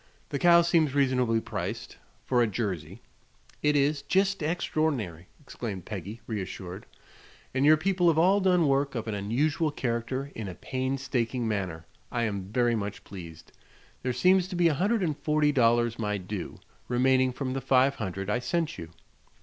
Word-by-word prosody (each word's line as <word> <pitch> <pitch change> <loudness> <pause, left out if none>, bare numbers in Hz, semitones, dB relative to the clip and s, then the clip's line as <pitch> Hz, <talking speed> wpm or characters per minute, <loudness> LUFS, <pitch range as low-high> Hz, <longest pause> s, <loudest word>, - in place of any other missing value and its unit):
The 140 - -2
cow 170 +1 +6
seems 160 -4 +2
reasonably 125 -5 +2
priced, - - -5 0.3
for 125 -2 +2
a 120 - +3
Jersey." 95 -3 -4 0.6
"It 150 0 +2
is. 145 +1 +2
Jest 195 +7 +1
extror'nary!" 150 - -1
exclaimed 115 - -6
Peggy, 105 +2 -6
reassured. 95 -2 -6 0.7
"And 135 +2 +2
your 155 +1 +7
people 180 +2 +1
have 165 -2 +4
all 190 +5 +4
done 180 -4 +3
work 140 0 +1
of 115 -1 -3
an 110 - -2
unusual 140 +11 0
character 130 +1 -3
in 110 -3 -5
a 90 - -6
painstaking 130 -2 -2
manner. 95 -7 -3 0.3
I 120 -1 0
am 100 -3 -3
very 120 0 +2
much 105 -2 -4
pleased. 85 -5 -11 0.5
There 125 - -1
seems 180 +9 +3
to 185 - -6
be 175 -1 +4
a - - +1
hundred 200 +7 +1
and 155 -4 0
forty 150 0 +2
dollars 120 -3 +2
my 105 -2 -1
due, 95 -1 -6 0.3
remaining 130 +1 +3
from 130 0 -3
the 135 - -3
five 135 +1 +3
hundred 95 -2 -4
I 105 +4 +1
sent 165 +5 -2
you." 80 - -7
130 Hz, 165 wpm, -28 LUFS, 105-150 Hz, 0.7 s, your